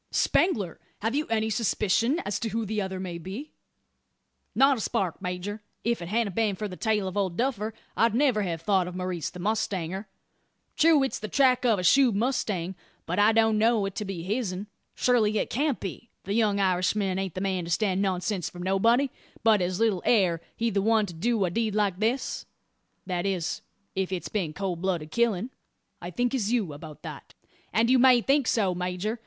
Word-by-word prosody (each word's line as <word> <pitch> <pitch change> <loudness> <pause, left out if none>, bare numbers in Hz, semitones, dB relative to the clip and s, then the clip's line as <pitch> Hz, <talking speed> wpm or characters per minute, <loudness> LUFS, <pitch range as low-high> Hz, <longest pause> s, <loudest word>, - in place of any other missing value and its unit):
"Spangler! 200 - +1 0.2
have 225 +2 0
you 300 +2 0
any 220 -1 0
suspicion 230 - +1
as 200 -1 -2
to 225 - -2
who 225 +1 -2
the 215 +1 -1
other 190 -1 -4
may 180 -2 -5
be?" 200 - -7 1.0
"Not 270 0 +5
a - - -4
spark, 185 -4 -1
major. 185 +3 -4 0.2
If't 235 -5 0
hadn't 215 -2 0
been 215 -3 +1
for 210 +3 -4
the 185 - -8
tale 210 -1 0
of 185 - -5
Old 190 -4 -1
Duffer 230 -4 -1 0.2
I'd 230 -1 +3
never 255 -5 +3
have 170 -5 -3
thought 190 -1 +2
of 180 - -7
Maurice 180 -4 -3
the 180 - -11
mustanger. 195 -2 -2 0.7
True, 315 -3 +5
it's 265 - -2
the 215 - -5
track 255 +1 +3
o' 225 - +4
a 180 - -3
shod 250 +4 +5
mustang; 205 -6 -1 0.3
but 180 +4 -2
I 210 +2 +6
don't 220 -1 +3
know 225 -2 +3
it 195 - -4
to - - -1
be 190 -4 -5
hisn. 200 -1 -2 0.3
Surely 220 -4 +2
it - - -1
can't 280 +2 0
be? 200 +5 -7
The 195 - -3
young 210 -2 +2
Irishman 190 +1 +1
aint 190 -3 -3
the - - -2
man 190 -3 -1
to - - -7
stand 190 +1 +1
nonsense 190 -1 -1
from 175 0 -8
nobody; 230 +8 +3 0.3
but 220 -3 +5
as 180 +1 -1
little 220 -6 +2
air 180 -8 +3
he 230 0 0
the 200 - +1
one 220 +1 +3
to 175 - -8
do 215 +4 +1
a 175 - -2
deed 220 +1 -1
like 200 -3 +1
this 230 +5 -1 0.6
that 180 0 -2
is, 175 -4 -2 0.3
if 190 -1 -1
it's 185 -2 -3
been 185 -8 -1
cold 185 -3 -3
blooded 175 -5 -2
killin'." 235 +1 +1 0.5
"I 175 - -5
think 245 +8 -1
as 230 -5 0
you 210 -11 0
about 150 +1 -11
that." - - -9 0.4
"And 225 +2 +3
you 255 +1 +5
may 250 -1 +6
think 275 0 +2
so, 200 -5 +2
major. 180 +5 -3
205 Hz, 200 wpm, -27 LUFS, 185-230 Hz, 1.0 s, I